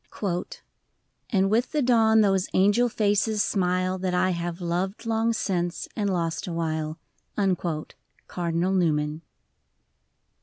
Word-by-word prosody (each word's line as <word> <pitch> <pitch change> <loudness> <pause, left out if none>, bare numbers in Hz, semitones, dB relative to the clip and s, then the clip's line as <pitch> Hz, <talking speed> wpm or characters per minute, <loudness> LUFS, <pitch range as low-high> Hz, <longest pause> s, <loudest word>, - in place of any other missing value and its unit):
] - - -49
And 195 -2 +2
with 235 +6 +1
the 300 -2 +1
dawn 225 -3 +4
those 195 -3 +2
angel 205 +6 +4
faces 210 0 +1
smile 185 -1 0
That 180 -1 -1
I 185 +1 +2
have 170 0 -3
loved 180 +5 -2
long 225 0 +1
since, 180 -5 -2
and 205 -2 0
lost 165 -3 -2
awhile. 160 -2 -2 1.3
Cardinal 175 +1 -1
Newman. 155 -4 +1
185 Hz, 115 wpm, -25 LUFS, 170-215 Hz, 1.3 s, dawn